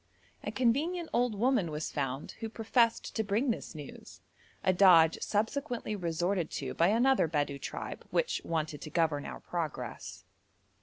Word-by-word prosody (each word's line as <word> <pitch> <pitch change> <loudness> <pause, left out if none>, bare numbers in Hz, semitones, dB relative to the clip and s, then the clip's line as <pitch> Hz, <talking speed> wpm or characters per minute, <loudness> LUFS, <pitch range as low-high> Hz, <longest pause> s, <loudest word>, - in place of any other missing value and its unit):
A - - -3
convenient 310 +8 0
old 240 -2 +2
woman 225 -5 +2
was 150 0 -4
found 135 -1 -3
who 225 -1 -4
professed 225 +1 +1
to 220 - +1
bring 220 +6 +1
this 220 - -5
news, 145 -3 -10 0.4
a 185 - +3
dodge 175 -4 +6
subsequently 230 +1 -1
resorted 175 -1 -1
to - - -3
by 170 - +3
another 240 +1 +3
Bedou 145 -3 -1
tribe - - -6
which - - 0
wanted 155 -3 -2
to 155 - -7
govern 155 -3 0
our - - -7
progress. 170 -4 -5
195 Hz, 150 wpm, -31 LUFS, 160-235 Hz, 0.4 s, dodge